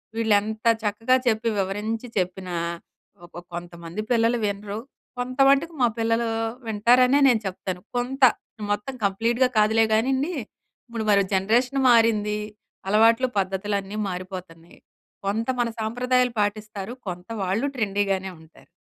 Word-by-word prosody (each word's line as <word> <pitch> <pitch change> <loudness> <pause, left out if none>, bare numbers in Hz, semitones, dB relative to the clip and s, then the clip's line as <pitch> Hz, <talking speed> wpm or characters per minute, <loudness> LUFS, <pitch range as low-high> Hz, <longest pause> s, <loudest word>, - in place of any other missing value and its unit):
వీళ్ళెంత 220 0 +1 0.2
చక్కగా 225 +5 +2
చెప్పి 230 0 +2
వివరించి 210 +5 -2
చెప్పినా, 180 -1 -2 0.7
ఒక 175 - -10
కొంతమంది 170 +2 -6
పిల్లలు 230 0 +3
వినరు, 205 +1 -3 0.4
కొంతవటుకు 275 +6 +3
మా 240 - +6
పిల్లలూ 230 +1 +1 0.4
వింటారనే 250 +6 +4
నేను 230 -4 +3
చెప్తాను. 185 -1 -4 0.2
కొంత. 260 +3 -3 0.5
మొత్తం 205 +6 -2
కంప్లీట్‌గా 235 +6 +1
కాదులే 220 +1 +4
గానీండి. 265 +9 +1 0.5
ఇప్పుడు 230 -2 -4
మరి 200 -1 +5
జనరేషన్ 240 +8 +2
మారింది. 215 -2 +3 0.5
అలవాట్లు, 230 +4 +4
పద్ధతులన్నీ 195 +1 -2
మారిపోతన్నాయి. 180 -2 -8 0.5
కొంత 225 +4 -1
మన 235 - 0
సాంప్రదాయాలు 250 +2 +1
పాటిస్తారు, 210 +1 -3
కొంత 180 0 -6 0.2
వాళ్ళు 195 +8 0
ట్రెండీగానే 195 -3 0
ఉంటారు. 160 0 -20
215 Hz, 110 wpm, -24 LUFS, 195-240 Hz, 0.7 s, మా